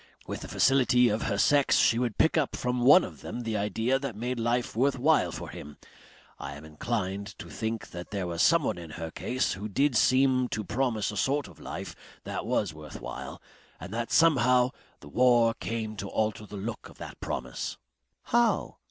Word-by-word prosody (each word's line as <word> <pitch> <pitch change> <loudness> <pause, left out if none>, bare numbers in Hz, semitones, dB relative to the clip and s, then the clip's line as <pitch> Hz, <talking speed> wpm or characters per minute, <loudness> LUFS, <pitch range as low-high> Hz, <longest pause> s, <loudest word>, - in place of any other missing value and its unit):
With - - -5
the - - -7
facility 125 -2 +4
of 105 +2 -1
her 100 - -1
sex 140 +6 +4
she 115 - +4
would 120 -3 -1
pick 160 - +3
up 155 -5 +1
from 125 0 -1
one 145 +9 +7
of - - -8
them 120 - -5
the 115 -2 -3
idea 110 +5 0
that 135 -5 -5
made 120 +3 -3
life 120 +1 0
worth 135 +4 +2
while 150 +5 +3
for - - -7
him. 75 0 -10 0.6
I - - -6
am 75 +2 -11
inclined 100 +4 -3
to - - -10
think 110 0 -4
there 90 +2 -5
was 85 -1 -2
someone 150 - +3
in 85 -2 -9
her 80 -1 -5
case 130 +8 -1
who 105 +3 -6
did 135 +5 +1
seem 130 +2 +4
to 110 - -3
promise 110 -1 -1
a 105 - -7
sort 140 +7 0
of - - -16
life - - -7 0.3
that - - -5
was - - 0
worth 75 0 -10
while. - - -7 0.4
And 90 +5 -8
that 115 +1 -3
somehow 125 -6 +4 0.3
the - - -12
war 120 +4 +4
came 110 -2 -4
to 100 - -4
alter 110 -1 -1
the 105 - -8
look 110 +4 -6
of - - -16
that - - -9
promise. 60 0 -4 0.5
"How?" 235 0 +1
115 Hz, 195 wpm, -28 LUFS, 100-130 Hz, 0.6 s, one